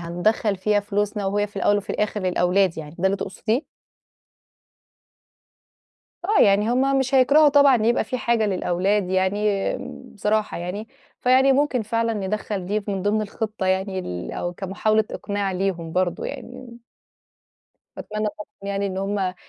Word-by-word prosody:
هندخّل 190 +4 0
فيها 205 +2 +1
فلوسنا 205 0 -2
وهي 205 +1 0
في 205 -1 -20
الأوّل 205 +1 +3
وفي 205 - -4
الآخر 210 0 -1
للأولاد 185 -1 +1
يعني، 150 -1 -8
ده 190 - +2
اللي 195 - +1
تقصديه؟ 220 - -2 2.6
آه، 420 +3 +3
يعني 205 +3 +4
هُم 270 +2 +2
مش 265 +1 0
هيكرَهوا 285 +4 +6
طبعًا 285 -2 +6
إن 215 - +1
يبقى 235 +2 +2
فيه 255 - -3
حاجة 235 -3 +1
للأولاد 185 0 0
يعني 195 +2 +1 0.4
بصراحة 210 0 0
يعني، 185 +6 -5 0.3
فيعني 260 +2 +5
ممكن 270 -3 +1
فعلًا 230 +1 0
ندخَّل 200 -1 -3
دي 210 +3 0
في 205 - -6
من 195 -2 -2
ضِمن 210 +2 +1
الخطة 215 -1 -4
يعني 190 0 0
ال 90 - -5
أو 175 - -3
كمحاولة 210 +4 0
إقناع 200 -1 -3
ليهم 180 -3 -2
برضه 180 -1 0
يعني. 250 -1 -8 1.2
باتمنى 215 0 -3
طبعًا 210 0 -9 0.3
يعني 200 0 -1
إن 190 -1 -4
هُم 195 -2 -1
205 Hz, 150 wpm, -23 LUFS, 190-220 Hz, 2.6 s, هيكرَهوا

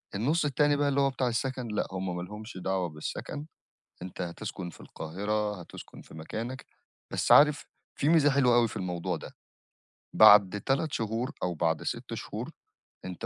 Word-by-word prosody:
النُص 150 +11 +1
التاني 145 +1 +2
بقى 145 0 +1
اللي 140 0 +2
هو 140 - +3
بتاع 130 -1 -1
السكن 125 +1 -2
لأ 105 -2 -2
هُم 95 -1 -3
ما 90 - -4
لهمش 105 +4 -8
دعوة 95 -1 -1
بالسكن، 75 - -6 0.6
أنت 90 0 -8
هتسكن 90 +1 -6
في - - -16
القاهرة، 105 +4 -3
هتسكن 85 - -11
في - - -16
مكانك، 115 +11 -6 0.4
بس - - +1
عارف 150 0 +6 0.3
في 145 - 0
ميزة 155 -3 +5
حلوة 135 -3 +4
أوي 120 -1 +4
في - - -9
الموضوع 90 -1 -2
ده، - - -10 0.8
بَعد 105 -2 +7
3 145 +3 0
شهور 115 +3 -2
أو 90 - 0
بَعد 80 -1 0
6 - - -4
شهور - - -6 0.5
أنت 90 -2 -6
105 Hz, 170 wpm, -29 LUFS, 90-135 Hz, 0.8 s, بَعد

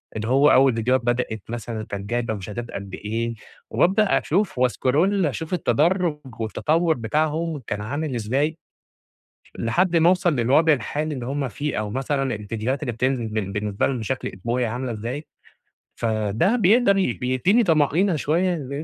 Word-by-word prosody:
اللي 110 0 -3
هو 135 +4 +5
أول 130 -2 +5
فيديوهات 125 +3 +1
بدأت 120 -3 -1
مثلًا 115 -1 -5
كانت 100 0 -6
جايبة 120 -1 -1
مشاهدات 105 +4 -6
قد 100 -1 -7
إيه، 115 +3 -3 0.4
وبابدأ 200 +3 +3
أشوف 190 -5 0
واسكرول 145 - +2
أشوف 155 +4 -3
التدرّج 175 0 +2 0.2
والتطوّر 160 +9 +1
بتاعهم 155 +6 -1
كان 105 0 -3
عامل 140 +5 -3
ازاي 135 +8 -1 1.0
لحد 170 +10 +1
ما 165 +1 +5
اوصل 180 -3 +2
للوضع 135 +7 +4
الحالي 150 +3 -2
اللي 125 -3 -5
هُم 135 +1 -2
فيه 150 +2 -3
أو 105 -1 -3
مثلًا 135 +1 -1
الفيديوهات 110 +6 -3
اللي 125 - -2
بتنزل 125 0 -1
بال 110 -3 -3
بالنسبة 105 0 -1
لهم 130 -3 -2
بشكل 120 +4 -3
اسبوعي 120 +6 -1
عاملة 125 +2 -3
إزاي، 120 +7 -5 0.7
فده 110 - +1
بيقدر 210 -1 +4
ي 185 -11 +1
بيديني 130 - +2
طَمأنينة 165 +2 +2
شويّة 155 -2 -1
130 Hz, 150 wpm, -23 LUFS, 115-160 Hz, 1.0 s, هو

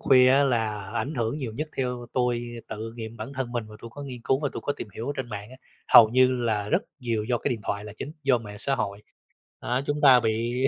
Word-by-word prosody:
khuya 130 -1 +6
á 140 +2 +5
là 110 -6 -1
ảnh 145 +6 -2
hưởng 115 +2 -1
nhiều 130 -7 -4
nhất, 155 +1 -3
theo 125 -2 -2
tôi 125 -1 +1 0.3
tự 110 +1 -6
nghiệm 115 0 -7
bản 115 +6 -7
thân 130 -2 -3
mình 120 -2 -2
và 105 - -11
tôi 115 - -8
có 145 - -7
nghiên 125 -4 -7
cứu 135 +2 +2
và 145 - +1
tôi - - -5
có 145 - 0
tìm 110 - -6
hiểu 115 - -5
ở 145 - -1
trên 130 -3 -4
mạng 105 -1 -6
á, 130 - -12 0.4
hầu 110 - +11
như 130 +1 +3
là 105 -2 0
rất - - +2 0.2
nhiều 115 -4 -1
do 120 0 0
cái - - -1
điện 115 -4 -2
thoại 100 +1 -3
là 105 - -8
chính, 150 - -6
do 135 -3 +3
mạng 105 -2 -9
xã 135 +6 +3
hội. 105 -3 -3 0.6
Đó, 125 +1 0
chúng 145 0 -1
ta 130 -4 +8
bị, 120 +3 0
120 Hz, 265 wpm, -26 LUFS, 110-130 Hz, 0.6 s, hầu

